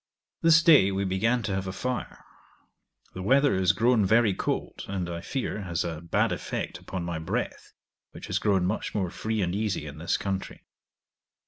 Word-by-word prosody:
This 165 0 +6
day 140 - +6
we 95 +1 -1
began 110 +6 +1
to 100 - -2
have 95 0 -2
a - - -2
fire. 125 +4 -4 0.9
The 95 - -6
weather 135 +8 +4
is 95 0 +3
grown 115 +3 +3
very 110 +1 +4
cold, - - -3
and 95 -3 -3
I 85 -1 -5
fear, 125 -3 -3
has 85 -4 -2
a 80 -2 -4
bad 85 - +1
effect - - -4
upon 95 -2 -5
my 85 -2 -3
breath, 80 - -4 0.4
which - - -10
has - - -1
grown 95 -4 +2
much 100 +4 -2
more 95 -4 -1
free 110 +1 -2
and 90 0 -1
easy 105 -6 -1
in 75 +1 -8
this 85 - 0
country. 95 -1 -4
95 Hz, 185 wpm, -27 LUFS, 90-110 Hz, 0.9 s, This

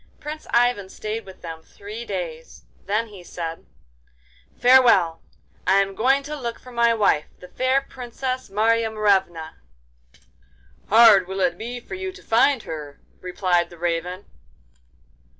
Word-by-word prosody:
Prince 305 +1 -7
Ivan 240 -5 +2
stayed 215 +2 -5
with 190 - -13
them 165 -1 -7
three 210 +7 -9
days; 170 -6 -6 0.2
then 215 +3 0
he 195 -4 -12
said: 165 -2 -7 0.9
'Farewell! 235 -10 +5 0.5
I 190 - +5
am 195 0 +2
going 265 +7 +2
to 300 +2 -5
look 240 -5 -5
for 255 - -14
my 235 -1 +3
wife, 205 -9 +2
the 180 - -12
fair 255 +8 +1
Princess 255 0 -5
Marya 225 +3 +2
Morevna.' 190 -7 0 1.3
'Hard 215 -4 +7
will 190 +1 -5
it 175 -2 +2
be 240 +6 -6
for 240 - -11
you 375 0 -4
to - - -15
find 240 +2 +3
her,' 150 -3 -8 0.2
replied 180 -1 0
the 175 - -14
Raven. 175 +2 -3
210 Hz, 140 wpm, -23 LUFS, 180-240 Hz, 1.3 s, Hard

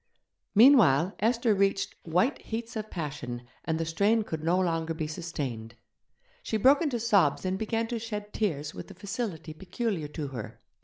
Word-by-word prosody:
Meanwhile 200 - +6
Esther 230 0 +2
reached 195 0 +1
white 180 - +1
heats 230 +1 -5
of 215 -1 -4
passion, 135 -7 -5 0.2
and 160 -1 0
the 165 - -1
strain 205 +7 +2
could 160 -6 -5
no 170 +3 +2
longer 165 -2 0
be 160 -1 -2
sustained. 140 -9 -5 0.7
She 220 - -1
broke 270 +8 +5
into 280 -8 0
sobs 200 -9 +3
and 185 0 0
began 225 +3 -1
to 235 - -2
shed 210 -2 -6
tears 155 -8 -1
with - - -8
the 195 - -12
facility 190 -5 -5
peculiar 190 0 -3
to 150 -1 -5
her. 120 -5 -7
185 Hz, 165 wpm, -28 LUFS, 155-220 Hz, 0.7 s, Meanwhile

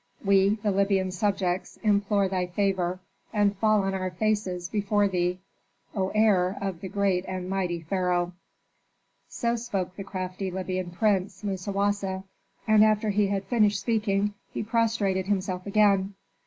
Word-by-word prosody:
We, 195 +1 +4
thy 210 - +2
Libyan 195 -1 +1
subjects, 190 -1 -1
implore 205 -1 +2
thy 185 -1 -1
favor 185 -1 0 0.3
and 205 -2 +2
fall 215 0 +3
on 195 0 -1
our 185 -1 -2
faces 185 -2 -1
before 205 +2 +1
thee, 180 -1 0 0.6
O 190 -2 0
heir 200 -4 +3
of 190 -4 -4
the 190 - -5
great 195 -3 +1
and 185 -1 -4
mighty 180 -3 -1
pharaoh." 180 0 0 1.0
So 235 0 -1
spoke 200 -6 -3
the 195 - -6
crafty 185 0 -4
Libyan 185 -1 -3
prince, 195 +1 0
Musawasa, 195 0 -1 0.4
and 215 -1 +6
after 215 0 +3
he 205 0 +2
had 195 0 -1
finished 210 -1 +2
speaking 205 -2 0 0.2
he - - -3
prostrated 215 -4 0
himself 185 -2 -1
again. 200 -1 +3
195 Hz, 140 wpm, -27 LUFS, 185-205 Hz, 1.0 s, and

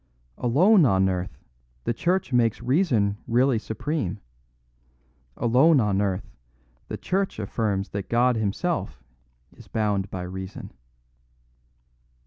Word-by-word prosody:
Alone 175 - +5
on 95 -7 +3
earth, 90 -1 -3 0.5
the - - 0
Church 180 +4 -1
makes 115 -3 +2
reason 125 - +1
really 125 0 +3
supreme. 110 - -3 1.2
Alone 135 +6 +4
on 100 -4 +1
earth, 95 -1 -2 0.6
the - - -5
Church 195 +1 -1
affirms 100 -1 -2
that 100 -1 -5
God 120 +1 +3
himself 105 - -2 0.5
is - - -15
bound 100 -3 -1
by 90 -1 -5
reason." 95 +1 -7
110 Hz, 110 wpm, -25 LUFS, 100-135 Hz, 1.2 s, Alone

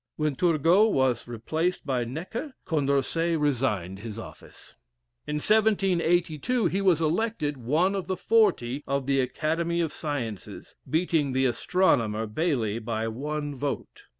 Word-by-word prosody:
When 150 -2 -1
Turgot 175 +7 +4
was 130 - +1
replaced 160 +11 -2
by 130 -4 0
Necker, 180 - -6
Condorcet 160 +2 +1
resigned 115 -10 0
his 110 0 -7
office. 115 - -11 0.5
In 150 - -2
1782 190 - +2
he 180 +4 +1
was 180 -5 +3
elected 160 -3 0
one 155 +11 +1
of 195 -2 -3
the 185 -1 -2
forty 180 - +2
of 140 -1 -1
the 135 0 +2
Academy 165 +6 -1
of 165 -3 -1
Sciences, 125 - -5
beating 160 -4 +1
the 130 +1 +2
Astronomer, 115 - +1
Bailly, 115 -3 -1
by 110 0 -2
one 145 +5 -3
vote. 140 +1 -5
150 Hz, 130 wpm, -27 LUFS, 125-175 Hz, 0.5 s, Turgot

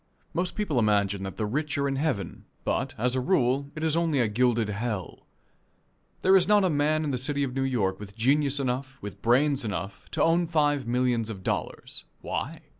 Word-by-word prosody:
Most 180 +1 -2
people 180 -12 0
imagine 100 -3 +2
that 95 -1 -6
the 110 - -1
rich 145 +8 -2
are 140 0 +1
in 135 - -1
heaven, 130 - -2 0.2
but, - - -1
as 125 +3 0
a 130 - +1
rule, 135 -2 +1
it 155 - -5
is 160 -1 +1
only 165 -4 +1
a 120 - +3
gilded 115 0 +1
hell. 105 -2 -4 1.0
There 190 +1 +6
is 185 - +4
not 210 -1 +5
a 185 - +2
man 155 +1 +1
in 150 - -1
the 125 - -1
city 140 +2 -1
of 130 -2 -2
New 135 - -1
York 110 -8 0
with 100 -1 -10
genius 140 +4 +2
enough, 130 +1 -2
with 100 -1 -8
brains 135 +4 +3
enough, 95 -2 -5
to - - 0
own 170 +1 +3
five 145 -5 +1
millions 120 -2 +1
of 95 -4 -7
dollars. - - -4 0.2
Why? - - -4
130 Hz, 200 wpm, -27 LUFS, 110-150 Hz, 1.0 s, There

